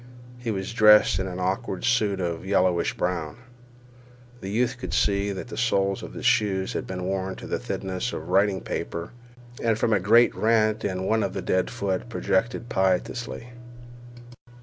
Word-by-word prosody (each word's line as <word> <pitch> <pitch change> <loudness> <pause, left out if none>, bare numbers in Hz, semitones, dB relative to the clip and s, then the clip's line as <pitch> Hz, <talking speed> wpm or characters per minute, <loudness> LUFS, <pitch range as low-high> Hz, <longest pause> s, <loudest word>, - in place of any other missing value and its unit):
He 120 -1 -4
was 95 0 -3
dressed 105 -4 +6
in 95 - -2
an 90 -1 -5
awkward 95 0 -2
suit 105 -5 +2
of 85 -2 -3
yellowish 95 -2 +1
brown. 85 -2 -2 1.0
The 95 - -6
youth 120 +4 0
could - - -4
see 100 0 +1
that 95 +5 -6
the - - -7
soles 100 -5 +1
of - - -9
his - - -6
shoes 95 -3 +2
had - - -4
been 90 -1 -5
worn 95 0 -2
to - - -10
the - - -2
thinness 95 +5 -3
of 80 - -6
writing 100 +1 +2
paper, 85 +7 -5 0.5
and 115 -2 +1
from 115 0 +1
a 105 - +3
great 115 +6 +5
rent 110 -1 +2
in 95 -2 -2
one 110 +4 +1
the - - -2
dead 95 0 +1
foot 100 -2 -3
projected 115 +1 -1
piteously. 110 +5 -1
100 Hz, 170 wpm, -25 LUFS, 95-110 Hz, 1.0 s, dressed